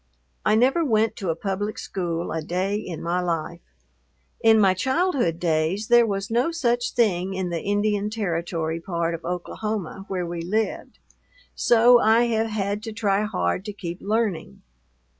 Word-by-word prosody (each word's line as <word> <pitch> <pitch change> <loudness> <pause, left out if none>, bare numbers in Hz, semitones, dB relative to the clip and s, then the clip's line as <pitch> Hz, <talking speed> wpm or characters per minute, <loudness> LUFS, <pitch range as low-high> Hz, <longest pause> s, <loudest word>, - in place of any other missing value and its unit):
I 215 - +3
never 265 +9 +3
went 220 -5 +2
to 190 -4 -3
a 165 - +1
public 200 +4 -3
school 170 -3 -3
a 160 - -2
day 185 +5 -2
in 185 -6 -5
my 170 +2 0
life. 170 -1 -3 0.8
In 225 -1 +6
my 195 -3 +5
childhood 260 - 0
days 170 +6 0
there 240 -1 +6
was 200 +1 -3
no 245 +7 +2
such 245 -8 0
thing 190 -5 +1
in 185 -2 -2
the 165 -2 -2
Indian 205 0 0
Territory 170 -6 -2
part 170 -1 -2
of 165 0 -6
Oklahoma 195 +2 -4
where 185 -3 -2
we 170 0 -4
lived, 215 +6 -2 0.6
so 240 +1 +5
I 225 +1 +4
have 225 0 +1
had 205 -1 -2
to 225 0 -6
try 210 -2 0
hard 190 -2 -1
to 210 - -5
keep 175 -3 -7
learning. 210 -6 -2
200 Hz, 160 wpm, -24 LUFS, 175-225 Hz, 0.8 s, In